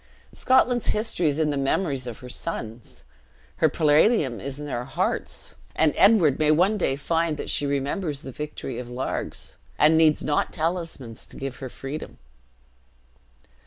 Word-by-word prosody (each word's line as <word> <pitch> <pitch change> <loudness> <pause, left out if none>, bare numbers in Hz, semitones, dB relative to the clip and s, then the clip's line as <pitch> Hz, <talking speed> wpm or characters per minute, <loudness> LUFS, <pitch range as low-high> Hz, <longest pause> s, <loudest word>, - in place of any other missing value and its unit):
Scotland's 250 -2 +3
history 210 -6 0
is 145 -1 +1
in 155 -2 +1
the 145 - -1
memories 135 -1 0
of 120 - -6
her 125 - -9
sons; 120 -4 -6 0.5
her - - +4
palladium 150 - +3
is 140 +1 -6
in 150 - -5
their 120 -4 -3
hearts; 130 0 -2 0.2
and 160 -2 +3
Edward 185 -10 +5
may 155 -1 +3
one 180 +7 +4
day 170 -9 +1
find 165 +2 0
that - - -4
she 145 - 0
remembers 140 +2 -2
the 135 - -7
victory 140 -3 -5
of 125 -1 -7
Largs, 125 +2 -4 0.2
and 160 +2 +5
needs 155 -2 +4
not 150 - 0
talismans 165 -8 -3
to - - -11
give 135 -1 -5
her 130 - -6
freedom." 135 +5 -7
150 Hz, 160 wpm, -25 LUFS, 135-165 Hz, 0.5 s, Edward